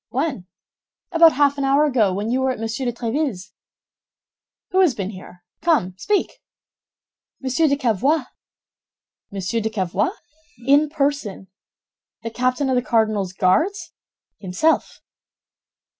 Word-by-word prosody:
"When?" 265 Hz, -, -2 dB, 0.6 s
"About 330 Hz, -1 st, +6 dB
half 285 Hz, +1 st, +2 dB
an -, -, -1 dB
hour 275 Hz, +2 st, +3 dB
ago, 240 Hz, -9 st, +2 dB
while 200 Hz, +3 st, -3 dB
you 255 Hz, +3 st, 0 dB
were 265 Hz, -, +1 dB
at 255 Hz, -, -3 dB
Monsieur 225 Hz, +3 st, -3 dB
de -, -, +1 dB
Tréville's." 235 Hz, -, -3 dB, 1.2 s
"Who 375 Hz, -, +2 dB
has 350 Hz, -10 st, +4 dB
been 195 Hz, -1 st, -4 dB
here? 180 Hz, -2 st, -13 dB, 0.2 s
Come, 310 Hz, -, +1 dB
speak." 405 Hz, -, -1 dB, 1.0 s
"Monsieur 265 Hz, +5 st, +1 dB
de 280 Hz, -, +2 dB
Cavois." 260 Hz, -, +1 dB, 1.1 s
"Monsieur 195 Hz, +3 st, -2 dB
de 220 Hz, -, -1 dB
Cavois?" 205 Hz, -, -1 dB, 0.5 s
"In 290 Hz, +3 st, +4 dB
person." 280 Hz, -, -2 dB, 0.7 s
"The 230 Hz, -, -4 dB
captain 255 Hz, +4 st, 0 dB
of 260 Hz, -, +1 dB
the 250 Hz, -, +2 dB
cardinal's 215 Hz, -5 st, 0 dB
Guards?" 325 Hz, -, +1 dB, 0.5 s
"Himself." 195 Hz, -, 0 dB
255 Hz, 130 wpm, -21 LUFS, 210-290 Hz, 1.2 s, About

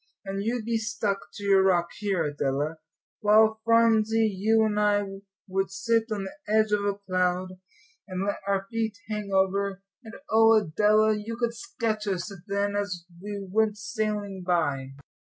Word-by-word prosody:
"And 195 Hz, 0 st, -3 dB
you'd 230 Hz, 0 st, -2 dB
be 230 Hz, -1 st, 0 dB
stuck 215 Hz, -3 st, -1 dB, 0.2 s
to 205 Hz, -, -8 dB
your 195 Hz, -1 st, +5 dB
rock 175 Hz, -3 st, +2 dB
here, 195 Hz, -5 st, 0 dB
Adela; 145 Hz, +1 st, -2 dB, 0.4 s
while, 220 Hz, +1 st, +4 dB
Phronsie, 225 Hz, -1 st, +4 dB
you 220 Hz, +3 st, +3 dB
and 210 Hz, -1 st, 0 dB
I 205 Hz, -1 st, +3 dB, 0.4 s
would 195 Hz, 0 st, -1 dB
sit 225 Hz, +4 st, +1 dB
on 205 Hz, -2 st, -2 dB
the 190 Hz, -, -7 dB
edge 215 Hz, 0 st, +3 dB
of 205 Hz, -1 st, +2 dB
a 200 Hz, -1 st, 0 dB
cloud, 185 Hz, 0 st, -1 dB, 0.5 s
and 185 Hz, 0 st, -3 dB
let 205 Hz, -, -1 dB
our 195 Hz, -1 st, 0 dB
feet 225 Hz, -2 st, -2 dB
hang 210 Hz, -2 st, -3 dB
over; 195 Hz, 0 st, +1 dB, 0.2 s
and 225 Hz, -1 st, -10 dB, 0.2 s
oh, 225 Hz, 0 st, +6 dB
Adela, 215 Hz, +2 st, +3 dB
you 220 Hz, +2 st, -5 dB
could 235 Hz, -1 st, -1 dB
sketch 220 Hz, -2 st, -3 dB
us 195 Hz, +1 st, -2 dB
then 200 Hz, 0 st, -1 dB
as 200 Hz, -4 st, -3 dB, 0.2 s
we 200 Hz, 0 st, -5 dB
went 215 Hz, +2 st, +1 dB
sailing 210 Hz, -2 st, -3 dB
by." 145 Hz, -7 st, 0 dB
205 Hz, 160 wpm, -27 LUFS, 190-220 Hz, 0.5 s, oh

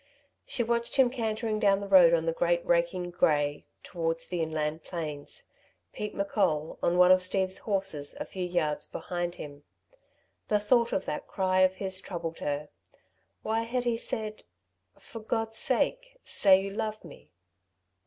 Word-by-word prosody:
She 245 Hz, -, 0 dB
watched 235 Hz, 0 st, -1 dB
him 260 Hz, -3 st, +4 dB
cantering 220 Hz, -3 st, -2 dB
down 200 Hz, -2 st, +3 dB
the 200 Hz, -, -6 dB
road 185 Hz, -4 st, +7 dB
on 165 Hz, -1 st, +2 dB
the 165 Hz, -, 0 dB
great 170 Hz, +1 st, +1 dB
raking 175 Hz, +1 st, +1 dB
grey, 145 Hz, -4 st, +1 dB, 0.2 s
towards 165 Hz, -2 st, -2 dB
the 175 Hz, -2 st, -3 dB
inland 155 Hz, 0 st, -2 dB
plains, 150 Hz, -5 st, -6 dB, 0.5 s
Pete 210 Hz, 0 st, -5 dB
M'Coll, 190 Hz, -6 st, 0 dB
on 175 Hz, +1 st, +1 dB
one 180 Hz, 0 st, +7 dB
of 185 Hz, 0 st, +6 dB
Steve's 185 Hz, 0 st, -1 dB
horses, 190 Hz, -8 st, -2 dB
a -, -, -3 dB
few 185 Hz, -, -5 dB
yards 175 Hz, -4 st, -1 dB
behind 175 Hz, -1 st, -4 dB
him. 145 Hz, -1 st, -9 dB, 0.8 s
The 210 Hz, -, +2 dB
thought 235 Hz, +2 st, +2 dB
of 190 Hz, -, -1 dB
that 150 Hz, -, -4 dB
cry 185 Hz, -1 st, 0 dB
of 185 Hz, 0 st, +4 dB
his 190 Hz, -1 st, -2 dB
troubled 165 Hz, -4 st, -5 dB
her. 145 Hz, +1 st, -3 dB, 0.7 s
Why 220 Hz, +1 st, 0 dB
had 240 Hz, +2 st, -2 dB
he 240 Hz, -1 st, +1 dB
said: 215 Hz, -1 st, -4 dB, 0.5 s
"For 225 Hz, -, -10 dB
God's 225 Hz, 0 st, -2 dB
sake, -, -, 0 dB
say 190 Hz, -2 st, +5 dB
you 195 Hz, -, -4 dB
love 215 Hz, 0 st, -4 dB
me!" 165 Hz, -, -14 dB
185 Hz, 160 wpm, -29 LUFS, 165-215 Hz, 0.8 s, road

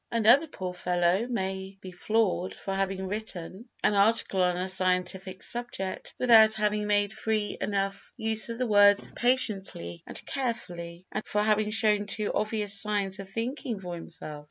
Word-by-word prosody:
Another 235 Hz, +7 st, +5 dB
poor 185 Hz, -9 st, -6 dB
fellow 180 Hz, +4 st, +1 dB
may 190 Hz, -3 st, -3 dB
be 185 Hz, -1 st, -9 dB
floored 190 Hz, -1 st, 0 dB
for 195 Hz, -, -5 dB
having 195 Hz, 0 st, -1 dB
written 200 Hz, +1 st, -5 dB
an -, -, +3 dB
article 200 Hz, -1 st, +2 dB
on 180 Hz, -1 st, +2 dB
a 185 Hz, +1 st, -2 dB
scientific 185 Hz, 0 st, -1 dB
subject 235 Hz, -6 st, -4 dB
without 220 Hz, -3 st, +6 dB
having 210 Hz, -1 st, 0 dB
made 205 Hz, 0 st, +2 dB
free 215 Hz, -1 st, -1 dB
enough 195 Hz, -1 st, -2 dB
use 220 Hz, -1 st, -1 dB
of 230 Hz, -, -4 dB
the 250 Hz, -, 0 dB
words 205 Hz, -2 st, +5 dB
"patiently" 195 Hz, -, 0 dB
and -, -, -9 dB
"carefully," 180 Hz, -9 st, -4 dB
and -, -, -3 dB
for 210 Hz, 0 st, 0 dB
having 215 Hz, 0 st, +2 dB
shown 210 Hz, -1 st, +2 dB
too 210 Hz, +1 st, -2 dB
obvious 210 Hz, -1 st, 0 dB
signs 200 Hz, -2 st, +1 dB
of 195 Hz, -1 st, -8 dB
thinking 230 Hz, +2 st, -4 dB
for 180 Hz, -2 st, -6 dB
himself. 155 Hz, -3 st, -7 dB
205 Hz, 155 wpm, -28 LUFS, 185-220 Hz, -, without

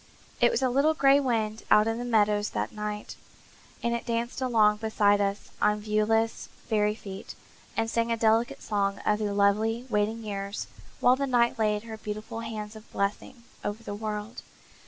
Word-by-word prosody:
There -, -, +5 dB
was 470 Hz, -, 0 dB
a 260 Hz, -, +3 dB
little 290 Hz, +5 st, +3 dB
gray 275 Hz, -1 st, +5 dB
wind 225 Hz, -5 st, -1 dB
out 210 Hz, -, +6 dB
in 225 Hz, +1 st, -1 dB
the -, -, -3 dB
meadows 210 Hz, -3 st, +2 dB
that -, -, -3 dB
night, 210 Hz, 0 st, -5 dB, 0.7 s
and 235 Hz, -, +1 dB
it 235 Hz, -, -3 dB
danced 235 Hz, +2 st, -2 dB
along 220 Hz, -5 st, +4 dB
beside 210 Hz, -2 st, +2 dB
us 200 Hz, 0 st, -2 dB
on 210 Hz, 0 st, +3 dB
viewless, 215 Hz, +1 st, 0 dB, 0.2 s
fairy 210 Hz, -1 st, +2 dB
feet, 195 Hz, -3 st, -9 dB, 0.4 s
and 225 Hz, -, +1 dB
sang 230 Hz, 0 st, 0 dB
a 230 Hz, -, +1 dB
delicate 230 Hz, +5 st, +2 dB
song 200 Hz, -2 st, 0 dB
of 210 Hz, 0 st, +2 dB
the 210 Hz, -1 st, -1 dB
lovely, 215 Hz, +4 st, +2 dB
waiting 215 Hz, +2 st, 0 dB
years, 200 Hz, -1 st, -4 dB, 0.4 s
while 250 Hz, -, +6 dB
the 275 Hz, +1 st, -2 dB
night 240 Hz, -2 st, +2 dB
laid 210 Hz, -1 st, +1 dB
her 225 Hz, -1 st, -7 dB
beautiful 215 Hz, +1 st, -6 dB
hands 220 Hz, -2 st, -6 dB
of 220 Hz, 0 st, -13 dB
blessing 205 Hz, +4 st, -3 dB, 0.2 s
over 205 Hz, +2 st, -4 dB
the 205 Hz, -, -5 dB
world. 210 Hz, +2 st, -5 dB
220 Hz, 175 wpm, -28 LUFS, 210-230 Hz, 0.7 s, out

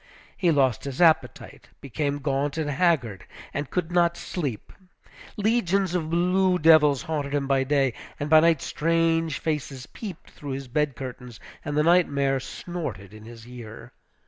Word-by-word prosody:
He 180 Hz, -, +1 dB
lost 135 Hz, -7 st, +2 dB
his 140 Hz, -2 st, -6 dB
appetite, 165 Hz, -3 st, +1 dB
became 140 Hz, +2 st, -3 dB
gaunt 140 Hz, +1 st, -2 dB
and 150 Hz, -2 st, -1 dB
haggard, 135 Hz, -, +1 dB, 0.3 s
and 145 Hz, -1 st, -4 dB
could 175 Hz, -3 st, -2 dB
get -, -, -9 dB
no 170 Hz, -1 st, +5 dB
sleep. 145 Hz, -, -5 dB, 0.6 s
Legions 200 Hz, -4 st, +1 dB
of 165 Hz, -3 st, -2 dB
blue 180 Hz, +2 st, +2 dB
devils 150 Hz, -4 st, +5 dB
haunted 145 Hz, -3 st, -3 dB
him 140 Hz, -1 st, 0 dB
by 135 Hz, -1 st, +2 dB
day, 135 Hz, -2 st, +1 dB, 0.3 s
and 145 Hz, -, -2 dB
by 155 Hz, +1 st, +7 dB
night 165 Hz, -2 st, +3 dB
strange 165 Hz, -1 st, 0 dB
faces 145 Hz, -5 st, -4 dB
peeped 195 Hz, -7 st, -9 dB
through 140 Hz, -2 st, -7 dB
his 135 Hz, 0 st, -6 dB
bed 145 Hz, +1 st, -1 dB
curtains, 125 Hz, -3 st, -8 dB, 0.2 s
and 145 Hz, 0 st, -3 dB
the 150 Hz, -, +3 dB
nightmare 140 Hz, -6 st, +2 dB
snorted 130 Hz, -, -7 dB
in 110 Hz, 0 st, -12 dB
his 115 Hz, 0 st, -12 dB
ear. 120 Hz, -3 st, -11 dB
145 Hz, 160 wpm, -25 LUFS, 135-165 Hz, 0.6 s, by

